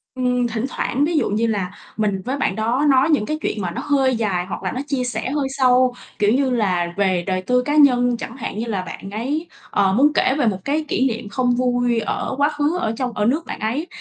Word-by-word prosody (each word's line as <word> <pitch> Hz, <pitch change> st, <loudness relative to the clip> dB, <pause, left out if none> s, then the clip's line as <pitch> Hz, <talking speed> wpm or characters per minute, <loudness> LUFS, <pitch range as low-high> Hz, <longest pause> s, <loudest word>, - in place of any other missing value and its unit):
Ừm, 250 Hz, -1 st, +1 dB
thỉnh 230 Hz, +1 st, -2 dB
thoảng, 275 Hz, +2 st, 0 dB
ví 330 Hz, +1 st, 0 dB
dụ -, -, +1 dB
như 220 Hz, +3 st, +1 dB
là, 200 Hz, -5 st, -1 dB, 0.3 s
mình 205 Hz, -3 st, 0 dB
với 265 Hz, +3 st, -2 dB
bạn 195 Hz, -8 st, 0 dB
đó 235 Hz, +7 st, 0 dB
nói 270 Hz, +2 st, +4 dB
những 290 Hz, -9 st, +2 dB
cái 305 Hz, +5 st, -2 dB
chuyện 210 Hz, -, -2 dB
mà 180 Hz, -2 st, -2 dB
nó -, -, -4 dB
hơi 270 Hz, -3 st, +2 dB
dài, 195 Hz, -6 st, -1 dB
hoặc 190 Hz, -, -6 dB
là 185 Hz, -, -1 dB
nó 255 Hz, -, -4 dB
chia 270 Hz, -2 st, -1 dB
sẻ 245 Hz, 0 st, -3 dB
hơi 290 Hz, -2 st, 0 dB
sâu, 255 Hz, -1 st, +4 dB, 0.3 s
kiểu 205 Hz, 0 st, +3 dB
như 270 Hz, 0 st, +2 dB
là, 185 Hz, -8 st, 0 dB
về 190 Hz, -3 st, +1 dB
đời 185 Hz, -1 st, 0 dB
tư 250 Hz, +6 st, +2 dB
cá 290 Hz, +4 st, -1 dB
nhân 245 Hz, -5 st, +4 dB
chẳng 230 Hz, +2 st, -7 dB
hạn. 225 Hz, -, -5 dB
Như 230 Hz, -, -2 dB
là 205 Hz, -5 st, -2 dB
bạn 190 Hz, +1 st, -8 dB
ấy, 275 Hz, +10 st, -3 dB, 0.2 s
ờ, 195 Hz, -1 st, +2 dB
muốn 285 Hz, +7 st, +4 dB
kể 265 Hz, -, +3 dB
về 260 Hz, -, +2 dB
một 200 Hz, -4 st, +1 dB
cái 305 Hz, +2 st, 0 dB
kỷ 265 Hz, -2 st, +1 dB
niệm 230 Hz, -3 st, -4 dB
không 245 Hz, +2 st, +1 dB
vui 245 Hz, -1 st, +1 dB
ở 225 Hz, -, -2 dB
quá 285 Hz, +1 st, +3 dB
khứ 295 Hz, +3 st, 0 dB
ở 225 Hz, -11 st, -1 dB
trong 255 Hz, -2 st, -2 dB
ở 210 Hz, -1 st, 0 dB
nước 290 Hz, +9 st, +1 dB
bạn -, -, -6 dB
ấy, 250 Hz, +10 st, -2 dB
245 Hz, 255 wpm, -21 LUFS, 210-270 Hz, 0.3 s, nói